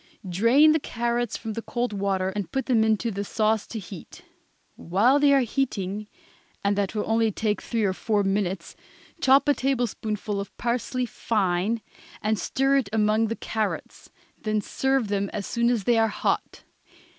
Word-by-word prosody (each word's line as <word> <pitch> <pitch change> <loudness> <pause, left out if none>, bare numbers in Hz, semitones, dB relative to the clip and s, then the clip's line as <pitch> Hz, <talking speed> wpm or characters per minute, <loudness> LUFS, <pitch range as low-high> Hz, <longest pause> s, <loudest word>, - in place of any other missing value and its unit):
Drain 230 - +5
the 315 - +3
carrots 240 -2 -2
from 225 -2 -5
the 230 - -4
cold 240 0 -2
water 195 -2 0
and 200 0 -4
put 270 -2 -1
them 235 -4 +3
into 220 +1 +1
the 200 0 -3
sauce 215 +1 0
to 230 - -6
heat. 190 -3 -10 0.5
While 220 - +3
they 290 -1 +5
are 275 -1 +5
heating 210 -5 -2 0.6
and 200 0 +2
that 200 +1 -1
will 210 - 0
only 225 0 +2
take 210 +1 -1
three 230 -2 -1
or 190 -2 +2
four 205 +1 0
minutes 195 -3 -1 0.5
chop 270 +2 +5
a 290 - +5
tablespoonful 225 -6 -2
of 200 - -7
parsley 250 +1 -1
fine, 210 -1 0 0.4
and 215 -1 0
stir 270 +1 +2
it 250 -7 0
among 215 +1 +2
the 230 - -2
carrots; 220 -2 -4 0.3
then 215 0 0
serve 265 +3 0
them 200 -1 -1
as 200 -2 -3
soon 235 0 +1
as 235 -4 +1
they 235 +2 +3
are 225 - +4
hot. 210 - -2
220 Hz, 170 wpm, -25 LUFS, 200-240 Hz, 0.6 s, Drain